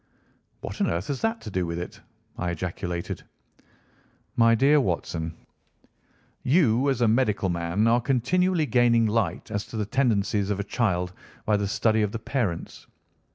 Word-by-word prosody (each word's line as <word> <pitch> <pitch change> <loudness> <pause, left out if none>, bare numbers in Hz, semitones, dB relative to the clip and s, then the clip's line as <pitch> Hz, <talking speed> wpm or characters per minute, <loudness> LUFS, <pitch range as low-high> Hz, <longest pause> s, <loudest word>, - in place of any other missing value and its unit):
"What - - -6
on - - +2
earth 85 - -2
has 140 -2 -2
that 225 +1 0
to 105 - -7
do 90 -2 -1
with 85 0 -3
it?" 85 - -7 0.3
I 90 - -2
ejaculated. 85 0 -4 1.1
"My 115 -1 +5
dear 140 +5 +4
Watson, 85 -5 -2 1.1
you 135 -3 +3
as 130 -3 0
a 120 - +4
medical 110 -4 +2
man 85 +4 0
are 120 +1 +4
continually 160 +8 +1
gaining 120 -3 +3
light 110 -2 -1
as 105 -1 -1
to 115 - -7
the 105 - -1
tendencies 105 -4 +1
of 100 -1 -1
a - - -1
child 90 -5 -1 0.3
by 105 - +3
the 100 -1 0
study 110 +2 +2
of 105 -1 0
the - - -1
parents. 110 -7 -3
110 Hz, 160 wpm, -26 LUFS, 90-125 Hz, 1.1 s, My